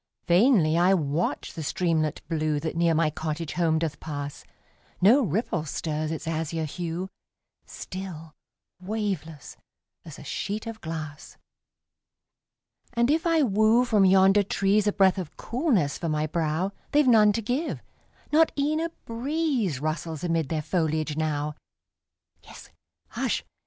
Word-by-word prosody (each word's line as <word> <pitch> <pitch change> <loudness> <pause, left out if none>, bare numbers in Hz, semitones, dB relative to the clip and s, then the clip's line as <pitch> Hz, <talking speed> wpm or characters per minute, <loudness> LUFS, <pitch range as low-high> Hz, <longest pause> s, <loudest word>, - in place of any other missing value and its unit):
Vainly 175 - +4
I 185 +2 +5
watch 155 0 -2
the 165 - -6
streamlet 160 -1 -1
blue 155 -2 0
That 160 +2 -4
near 165 -1 +2
my 155 -1 +2
cottage 155 +1 -4
home 165 -2 +2
doth 160 -2 -2
pass, 145 -2 -6 0.6
No 225 +10 +6
ripple 180 - -1
stirs 155 0 -3
its 160 0 -5
azure 160 0 -2
hue, 170 +4 -4 0.6
Still 175 -5 -8 0.5
waveless, 185 - -4 0.5
as 155 -5 -10
a - - -11
sheet 205 +9 -4
of 225 -1 -7
glass 155 -2 -7 1.6
And 235 +2 +2
if 320 +2 +1
I 325 -2 +3
woo 220 +2 +3
from 215 -5 +3
yonder 190 +2 +5
trees 200 +1 +1
A - - +4
breath 195 -2 +3
of 175 -5 -7
coolness 230 - 0
for 165 - -2
my 155 0 0
brow, 160 +3 -1 0.2
They've 295 -1 +4
none 215 -4 +6
to 230 - -1
give 255 +9 -2 0.5
not 320 +2 +4
e'en 300 +2 +1
a 330 +1 -1 0.2
breeze 245 - -1
Rustles 155 +1 -3
amid 165 -4 0
their 155 -2 -2
foliage 155 -3 -1
now; 150 -1 -1 0.9
Yes, - - -13 0.4
hush! - - -2
170 Hz, 140 wpm, -26 LUFS, 155-215 Hz, 1.6 s, No